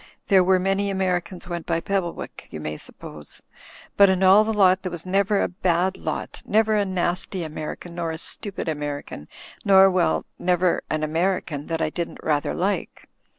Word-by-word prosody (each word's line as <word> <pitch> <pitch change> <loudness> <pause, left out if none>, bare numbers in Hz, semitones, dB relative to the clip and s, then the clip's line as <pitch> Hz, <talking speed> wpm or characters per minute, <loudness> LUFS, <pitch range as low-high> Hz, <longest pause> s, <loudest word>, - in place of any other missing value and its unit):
There 190 -3 +6
were 185 +1 +4
many 195 +2 0
Americans 180 -2 -2
went 170 -2 -5
by 165 -1 +1
Pebblewick, 185 -1 -4
you 75 - -7
may 75 0 -5
suppose. 75 -1 -11 0.5
But 200 -1 +7
in 190 0 +1
all 195 +3 +7
the 220 - -1
lot 190 -3 +4
there 185 - -4
was 170 0 -7
never 195 +2 +2
a - - +1
bad 180 0 0
lot; - - -5
never 220 +1 +2
a 205 -1 +2
nasty 185 0 -2
American, 155 +2 -6
nor 170 -1 -3
a 160 - -4
stupid 195 +3 -4
American 145 - -4 0.2
— - - -20
nor, 195 -1 +6
well, 170 - +1
never 180 0 +2
an 155 0 -1
American 160 -2 -1
that 165 -1 -1
I 155 - -1
didn't 170 0 -4
rather 150 -2 0
like." 195 +3 -3
180 Hz, 180 wpm, -23 LUFS, 165-195 Hz, 0.5 s, But